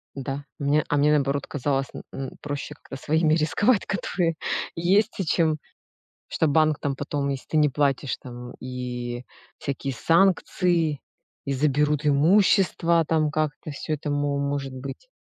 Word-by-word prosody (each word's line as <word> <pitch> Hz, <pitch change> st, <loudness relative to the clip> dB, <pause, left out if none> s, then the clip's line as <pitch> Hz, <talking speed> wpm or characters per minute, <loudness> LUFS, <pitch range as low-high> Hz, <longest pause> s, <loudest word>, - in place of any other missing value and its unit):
Да, 135 Hz, +1 st, -4 dB, 0.2 s
мне 145 Hz, +2 st, +2 dB
а 145 Hz, -, +2 dB
мне 145 Hz, +1 st, +4 dB
наоборот 140 Hz, -1 st, +1 dB
казалось 135 Hz, -1 st, -1 dB
м -, -, -7 dB
м 135 Hz, -1 st, -5 dB
проще 145 Hz, +1 st, -5 dB
как-то 140 Hz, -, -11 dB
своими 155 Hz, +3 st, +2 dB
рисковать, 195 Hz, +8 st, +2 dB
которые 175 Hz, -4 st, -1 dB, 0.4 s
есть, 185 Hz, +6 st, +3 dB
чем 155 Hz, -1 st, +2 dB, 0.7 s
что 160 Hz, -, +1 dB
банк 155 Hz, 0 st, +3 dB
там 140 Hz, -1 st, -2 dB
потом, 145 Hz, 0 st, -2 dB
если 135 Hz, -1 st, -4 dB
ты 155 Hz, -, 0 dB
не 150 Hz, -1 st, +5 dB
платишь, 140 Hz, -1 st, 0 dB
там, 125 Hz, 0 st, -9 dB
и 125 Hz, -1 st, -5 dB, 0.4 s
всякие 140 Hz, -1 st, -3 dB
санкции, 170 Hz, -1 st, +2 dB, 0.5 s
и 140 Hz, -, -1 dB
заберут 150 Hz, +2 st, +1 dB
имущество, 170 Hz, +2 st, +4 dB
там 155 Hz, -2 st, +2 dB
как-то 155 Hz, 0 st, -2 dB
всё 145 Hz, +2 st, -4 dB
это 150 Hz, 0 st, -3 dB
мо 145 Hz, 0 st, 0 dB
может 140 Hz, -1 st, -2 dB
быть. 135 Hz, -, -8 dB
145 Hz, 145 wpm, -25 LUFS, 140-160 Hz, 0.7 s, не